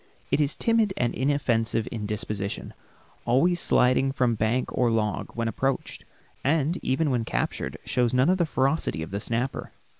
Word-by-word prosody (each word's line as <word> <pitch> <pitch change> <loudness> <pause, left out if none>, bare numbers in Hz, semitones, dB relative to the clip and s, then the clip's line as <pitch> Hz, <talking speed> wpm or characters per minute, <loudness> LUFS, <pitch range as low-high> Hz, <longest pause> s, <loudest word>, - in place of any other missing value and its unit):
It 150 - +3
is 145 0 0
timid 225 -4 +1
and 120 -1 0
inoffensive 120 -5 0
in 110 -3 -4
disposition, 105 -2 -2 0.5
always 170 +9 +2
sliding 130 -2 +3
from 125 -3 +1
bank 115 +4 -1
or 125 -2 +2
log 110 -2 -1
when 115 -1 -1
approached, 135 +5 -2 0.4
and 155 +4 +1
even 140 +3 0
when 120 -3 0
captured 70 -8 -2
shows 125 -2 +1
none 125 +2 +3
of 185 - +1
the 170 - +2
ferocity 135 - 0
of 80 - -8
the 100 - -2
snapper. 120 +5 -3
125 Hz, 160 wpm, -26 LUFS, 115-140 Hz, 0.5 s, It